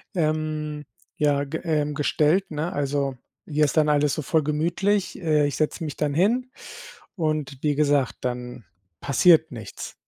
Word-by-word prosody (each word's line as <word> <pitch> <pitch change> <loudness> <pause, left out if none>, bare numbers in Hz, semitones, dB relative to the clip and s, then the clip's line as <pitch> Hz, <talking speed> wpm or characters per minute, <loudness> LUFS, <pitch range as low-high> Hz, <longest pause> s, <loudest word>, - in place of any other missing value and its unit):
Ähm, 155 -2 -2 0.3
ja, 145 -1 +2
ge 150 +3 -5
äh, 150 -3 0
gestellt, 155 +5 +1
ne. 155 +3 -2
Also, 140 -2 -1 0.3
hier 150 0 +2
ist 145 - -2
dann 155 -1 +4
alles 145 -1 +2
so 155 - -2
voll 155 +2 +1
gemütlich, 175 +7 0
äh, 150 -3 +2
ich 140 - -3
setze 155 +2 -1
mich 150 - -5
dann 150 -2 0
hin 235 - +1 0.6
und 155 -5 -2
wie 150 -1 +1
gesagt, 145 -3 +1
dann 125 -3 -5 0.4
passiert 160 +2 +4
nichts. 115 -4 -8
150 Hz, 155 wpm, -24 LUFS, 145-160 Hz, 0.6 s, dann